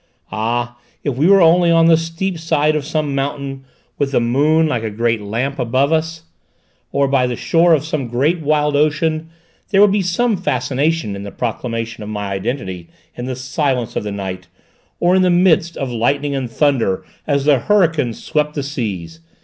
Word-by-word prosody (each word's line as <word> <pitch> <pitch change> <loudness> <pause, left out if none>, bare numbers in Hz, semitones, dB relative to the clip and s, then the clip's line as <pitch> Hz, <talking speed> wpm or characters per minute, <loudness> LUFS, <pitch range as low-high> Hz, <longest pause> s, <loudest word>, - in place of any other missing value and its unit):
Ah, 120 +3 -2 0.2
if 140 -4 -1
we 145 +6 +2
were 195 -1 +6
only 170 +1 +5
on 165 -1 +5
the 165 0 +6
steep 165 +2 -3
side 155 -1 +1
of 150 - -1
some 155 -3 -1
mountain 135 -1 -3 0.4
with 140 -1 0
the - - +4
moon 145 +7 +2
like 125 -7 -1
a 110 - -3
great 115 +1 0
lamp 120 +7 -3
above 130 +5 +1
us, 160 0 -1 0.7
or 140 0 +2
by 135 -2 +2
the 125 - -3
shore 165 +6 +3
of 150 -1 -3
some 150 -6 -3 0.3
wild 150 -1 +1
ocean, 155 +2 +1 0.4
there 195 - +2
would 205 -1 +6
be 205 0 +2
some 210 +6 +1
fascination 140 - -1
in 100 - -7
the 100 - -6
proclamation 115 0 -4
of 105 - -6
my 105 -2 -4
identity 95 -4 -4 0.3
in 120 - -6
the 130 0 -3
silence 130 -1 -2
of - - -1
the 105 - -4
night, 95 -2 -5 0.5
or 175 +1 +3
in 190 - +4
the 185 - +3
midst 175 -2 +3
of 135 -2 -3
lightning 140 +5 0
and 135 -3 -3
thunder 120 -8 +1 0.2
as 140 -2 +1
the 145 -3 +4
hurricane 165 - +2
swept 150 +6 -2
the 145 - -2
seas! 100 - -5
140 Hz, 185 wpm, -18 LUFS, 120-160 Hz, 0.7 s, were